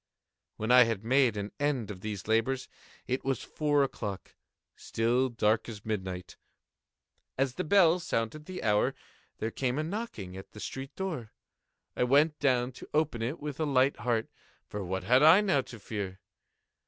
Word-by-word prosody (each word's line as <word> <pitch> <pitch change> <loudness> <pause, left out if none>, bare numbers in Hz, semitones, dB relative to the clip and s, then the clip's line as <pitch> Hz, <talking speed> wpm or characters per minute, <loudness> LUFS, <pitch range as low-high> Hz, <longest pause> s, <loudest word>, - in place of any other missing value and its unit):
When 110 +2 -1
I 125 -1 +8
had 115 -3 -2
made 125 -2 +3
an 100 0 -4
end 140 -7 0
of 95 -2 -9
these 105 -2 -5
labors, 120 +4 +1 0.4
it 130 +1 -2
was 135 -1 -1
four 145 -2 +1
o'clock—still 115 +2 -3
dark 110 -1 +1
as 105 -2 -9
midnight. 95 -4 -4 1.0
As 135 -1 +1
the - - -3
bell 180 -1 +5
sounded 150 -1 -2
the 185 0 -6
hour, 105 -2 +2 0.4
there 110 - -3
came 130 +1 -1
a 155 - 0
knocking 160 - -5
at 95 - -10
the 105 - -10
street 135 +5 -6
door. 160 - -4 0.7
I - - +1
went 150 +4 +3
down 125 -3 +2
to - - -10
open 150 -7 +1
it 125 +8 -2
with 150 -1 -6
a 160 - +1
light 135 0 +3
heart,—for 115 -3 -4
what 95 +1 -3
had 125 +7 +4
I 160 +5 +8
now 190 -9 +2
to 120 - -11
fear? 100 -2 -5
125 Hz, 165 wpm, -30 LUFS, 110-145 Hz, 1.0 s, I